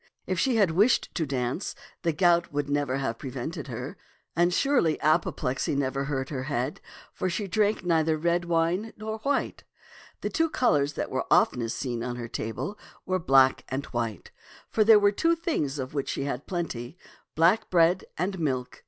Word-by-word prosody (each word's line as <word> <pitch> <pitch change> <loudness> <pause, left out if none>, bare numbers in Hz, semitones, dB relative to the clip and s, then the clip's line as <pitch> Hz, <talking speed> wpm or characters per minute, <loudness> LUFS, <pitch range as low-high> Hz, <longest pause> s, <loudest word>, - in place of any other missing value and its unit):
If 185 -2 -1
she 255 +5 +2
had 200 -6 +4
wished 205 +9 +3
to 160 -4 -1
dance, 130 +5 -2 0.3
the 170 - +1
gout 170 +1 +3
would 145 0 -1
never 145 -2 0
have 125 -4 -3
prevented 140 +4 -5
her; 125 +3 -6 0.4
and 175 +1 +3
surely 215 - +2
apoplexy 150 -4 0
never 135 0 -1
hurt 135 -2 -2
her 130 -3 -4
head, 140 -1 -2 0.3
for 185 - -2
she 200 +4 -2
drank 210 +2 +1
neither 160 -2 +2
red 170 +2 +1
wine 170 +6 0
nor 220 +1 -5
white. 280 +6 -1 0.6
The - - -2
two 325 -4 +1
colors 150 - +2
that - - -4
were - - -2
oftenest 115 -2 +3
seen 120 -3 -3
on 125 0 -3
her 120 -1 -5
table 115 - -4 0.3
were 185 0 0
black 135 -4 +4
and 135 +2 -3
white, 115 -3 -3 0.4
for 220 - +3
there 220 0 +8
were 205 -1 +4
two 330 +11 +2
things 225 - -2
of 130 0 -5
which 140 -2 -2
she - - -2
had 140 -1 -4
plenty, 160 -6 -4 0.2
— - - -34
black 185 +8 +3
bread 175 +1 +3
and 185 +2 -2
milk. 130 -5 -2
160 Hz, 180 wpm, -27 LUFS, 135-185 Hz, 0.6 s, there